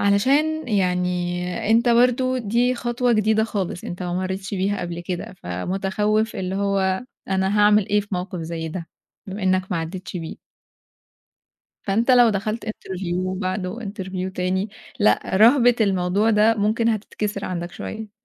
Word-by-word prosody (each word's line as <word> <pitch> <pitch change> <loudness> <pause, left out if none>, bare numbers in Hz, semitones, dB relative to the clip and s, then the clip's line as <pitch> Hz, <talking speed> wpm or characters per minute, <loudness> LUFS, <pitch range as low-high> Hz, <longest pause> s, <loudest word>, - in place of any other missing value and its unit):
علشان 275 +9 +2
يعني 180 -1 -1
أنت 235 +2 +4
برضه 250 +2 +3
دي 240 +3 +1
خطوة 240 0 0
جديدة 220 0 +3
خالص، 195 -5 -3
أنت 175 +1 -6
ما 175 0 -2
مرّيتش 190 +1 -3
بيها 195 +2 0
قبل 175 -1 -4
كده 175 +1 -5
فمتخوّف، 195 - -1
اللي 190 0 -3
هو 195 0 0 0.3
أنا 190 +2 +1
هاعمل 210 -1 +5
إيه 210 0 +3
في 205 - -11
موقِف 180 -1 -3
زي 165 0 -4
ده 165 0 -6 0.4
بما 195 +1 -6
إنك 185 0 +3
ما - - 0
عدّتش 180 +3 -5
بيه. 165 -1 -7 1.4
فأنت 225 +6 +2
لو 245 -2 +7
دخلت 215 +3 -2
interview 185 -3 -3
بعده 185 +3 -3
interview 190 -3 -5
تاني 185 +3 -1 0.3
لأ، 210 - +4 0.2
رهبة 245 +2 +6
الموضوع 195 +2 +2
ده 220 +1 +4
ممكن 220 +2 +1
هتتكسر 210 -1 -3
عندَك 175 -1 -4
شوية. 220 -1 -7
200 Hz, 145 wpm, -22 LUFS, 185-220 Hz, 1.4 s, لو